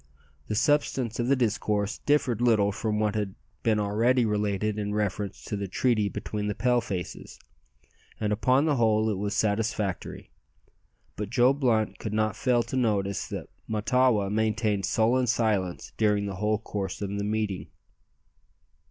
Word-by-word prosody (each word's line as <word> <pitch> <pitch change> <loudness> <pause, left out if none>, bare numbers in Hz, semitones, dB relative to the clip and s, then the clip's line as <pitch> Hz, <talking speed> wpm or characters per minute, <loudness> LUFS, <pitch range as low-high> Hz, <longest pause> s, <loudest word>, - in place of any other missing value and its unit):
The 105 - -2
substance 130 -2 +1
of 120 - 0
the 140 - +4
discourse 105 -4 0
differed 130 -6 +1
little 110 -4 +3
from 105 +1 -2
what 105 -1 +1
has 105 -2 -1 0.3
been 110 -2 +2
already 115 +5 +2
related 105 0 0
in 105 0 -2
reference 105 -1 -2
to - - -3
the 100 -1 -3
treaty 110 +1 +1
between 105 0 -4
the 105 - -2
Pale 125 +1 +2
faces, 95 -5 -6 0.8
and 105 -1 0
upon 130 +7 +3
the 150 -3 +2
whole 110 -1 +3
it 100 - -2
was 100 0 -2
satisfactory. 105 -2 -1 0.8
But 105 -1 -4
Joe 125 +3 +4
Blunt 120 -6 0
could 105 - -4
not 110 -1 +1
fail 125 -2 +2
to - - -6
notice 100 -6 0
that - - -6 0.2
Mahtawa 110 -2 +2
maintained 110 -2 0
sullen 125 +3 +2
silence 105 -6 0
during 105 -2 +2
the 100 -2 -5
whole 105 +2 +1
course 100 -3 -4
of 100 0 -3
the - - -2
meeting. 105 -2 -2
110 Hz, 155 wpm, -27 LUFS, 105-120 Hz, 0.8 s, the